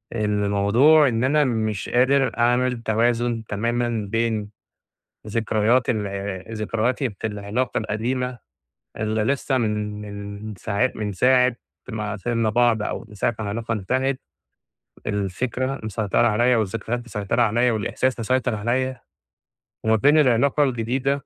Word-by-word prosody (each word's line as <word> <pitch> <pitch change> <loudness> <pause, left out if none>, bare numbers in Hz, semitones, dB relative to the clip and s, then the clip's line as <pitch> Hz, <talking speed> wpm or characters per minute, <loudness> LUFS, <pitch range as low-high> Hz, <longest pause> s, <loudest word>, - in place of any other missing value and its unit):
الموضوع 105 +8 +4
إن 115 0 0
أنا 150 +3 +3
مش 110 -5 -1
قادر 130 +2 +2
أعمل 120 +1 +2
توازن 115 +1 +1
تمامًا 115 +1 -1
بين 115 -2 0 0.8
ذكريات 110 +3 +1
ال 100 -1 -4
ذكرياتي 115 +4 -1
في 105 +2 -5
العلاقة 105 +5 -2
القديمة، 120 +3 -2 0.6
اللي 110 0 -1
لسه 135 +1 0
من 105 -2 -2 0.5
من 105 - -6
ساع 105 +7 0
من 105 -1 -3
ساعة 125 +3 +3 0.3
ما 110 -3 -3
سبنا 115 +1 0
بعض، 120 -1 +3
أو 115 - -4
من 105 - -14
ساعة 110 +4 0
ما 110 - -3
العلاقة 115 +3 -3
انتهت، 130 +6 -1 0.9
الفكرة 120 +7 -2
مسيطرة 110 +1 +1
عليّا، 120 +3 +3
والذكريات 115 +3 -2
مسيطرة 105 +1 -1
عليّا، 120 +2 +2
والإحساس 120 +4 -1
مسيطر 125 0 0
عليّا، 125 +4 -1 0.8
وما 110 0 +3
بين 145 +8 +4
العلاقة 140 +2 +3
الجديدة، 130 +2 -1
115 Hz, 125 wpm, -23 LUFS, 105-125 Hz, 0.9 s, الموضوع